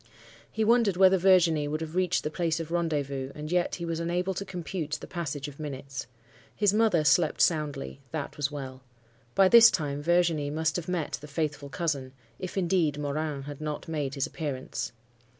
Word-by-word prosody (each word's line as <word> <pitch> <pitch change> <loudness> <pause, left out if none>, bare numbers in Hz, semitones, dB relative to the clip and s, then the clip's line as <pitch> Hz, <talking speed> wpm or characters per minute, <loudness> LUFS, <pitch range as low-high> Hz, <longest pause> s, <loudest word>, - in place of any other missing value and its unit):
He 220 - 0
wondered 225 -4 +3
whether 190 0 +6
Virginie 170 -5 +4
would 155 +1 -2
have 160 +1 -5
reached 185 -1 +1
the 150 - -2
place 165 0 0
of 165 0 -6
rendezvous, 145 -6 -1
and 150 +1 -6
yet 180 -1 +1
he 170 - -5
was 165 -1 -2
unable 175 +3 -1
to 195 - -4
compute 175 -4 -5
the - - -8
passage 150 -5 -4
of 145 0 -11
minutes. 135 -3 -6 0.5
His 205 -2 +3
mother 210 -7 +3
slept 155 +1 +3
soundly: 150 -4 0
that 155 -3 -4
was 145 -1 -1
well. 135 -3 -7 0.5
By 195 - +6
this 230 +3 +9
time 145 -3 -2
Virginie 165 -3 +2
must 160 +2 0
have 175 -2 -3
met 180 -4 -2
the 150 - -9
'faithful 145 -1 -3
cousin:' 140 -5 -2 0.3
if, 185 +1 -6
indeed, 170 -5 +1
Morin 145 0 -2
had 145 +1 -8
not 150 -1 -4
made 150 -4 -2
his 140 - 0
appearance. 140 -5 -4
155 Hz, 185 wpm, -28 LUFS, 145-175 Hz, 0.5 s, this